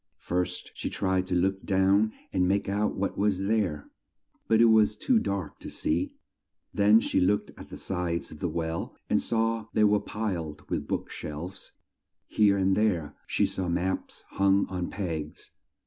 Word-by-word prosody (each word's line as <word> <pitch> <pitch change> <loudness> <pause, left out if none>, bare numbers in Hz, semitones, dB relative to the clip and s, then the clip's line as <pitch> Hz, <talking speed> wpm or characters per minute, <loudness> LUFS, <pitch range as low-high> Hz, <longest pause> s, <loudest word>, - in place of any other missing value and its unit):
First 90 0 -3
she - - -4
tried 95 -1 0
to 90 - -1
look 95 +2 +1
down 100 +2 +3 0.2
and 90 -1 +2
make 100 +2 +1
out 100 +2 0
what 100 +1 -2
was 100 -2 +2
there, 95 -8 0 0.6
but 110 - +4
it 115 - +7
was 110 -2 +5
too 250 -4 +2
dark 100 - -3
to - - -8
see; 80 +3 -1 0.6
then 105 +2 +6
she - - 0
looked 100 +3 +1
at - - -11
the - - -8
sides 90 -2 -3
of 75 - -10
the 90 - -1
well 80 0 -3 0.2
and - - +3
saw 115 0 0
that 110 - -16
they 110 - +4
were 105 0 +5
piled 95 -8 -4
with - - -2
book - - -3
shelves; 85 +6 -7 0.5
here 100 -2 +3
and 95 0 +2
there 95 -9 0
she - - +2
saw 95 -2 -3
maps 90 +2 -2
hung 100 0 +3
on 90 -1 -3
pegs. 80 -6 -5
95 Hz, 175 wpm, -28 LUFS, 90-105 Hz, 0.6 s, it